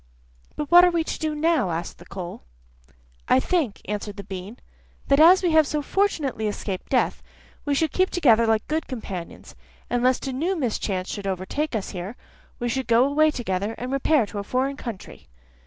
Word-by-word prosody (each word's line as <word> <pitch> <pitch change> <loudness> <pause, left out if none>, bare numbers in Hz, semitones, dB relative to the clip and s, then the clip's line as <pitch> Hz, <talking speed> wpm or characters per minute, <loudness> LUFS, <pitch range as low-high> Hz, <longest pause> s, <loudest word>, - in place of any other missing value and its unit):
'But 300 +1 -5
what 350 +1 +9
are 360 - +6
we 340 -2 0
to - - -5
do 310 -2 -2
now?' 295 - +1
said - - -10
the - - -14
coal. 180 -2 -7 0.9
'I - - +5
think,' 305 - -1
answered 205 0 -4
the 200 - -6
bean, 195 +4 -8 0.5
'that 275 +1 +4
as 355 +4 +7
we 350 - +2
have 315 -2 +5
so 300 0 -2
fortunately 290 - 0
escaped 200 -2 -4
death, 255 - +1 0.4
we 290 -1 +1
should 315 0 +1
keep 370 0 +2
together 235 -9 +4
like 220 -1 +1
good 315 +1 -2
companions, 195 -9 -7 0.4
and 245 0 +1
lest 255 +2 +2
a 265 - -3
new 335 +9 -1
mischance 205 - -2
should 200 -2 -5
overtake 195 - -2
us 210 - -3
here, 185 +5 -6 0.4
we 240 - -3
should 260 +2 -2
go 235 +1 +5
away 305 +3 +3
together, 210 -5 -2
and 250 +1 -5
repair 275 -1 +2
to 205 0 -6
a - - -4
foreign 260 +6 -1
country. 235 -8 -8
255 Hz, 190 wpm, -24 LUFS, 205-310 Hz, 0.9 s, what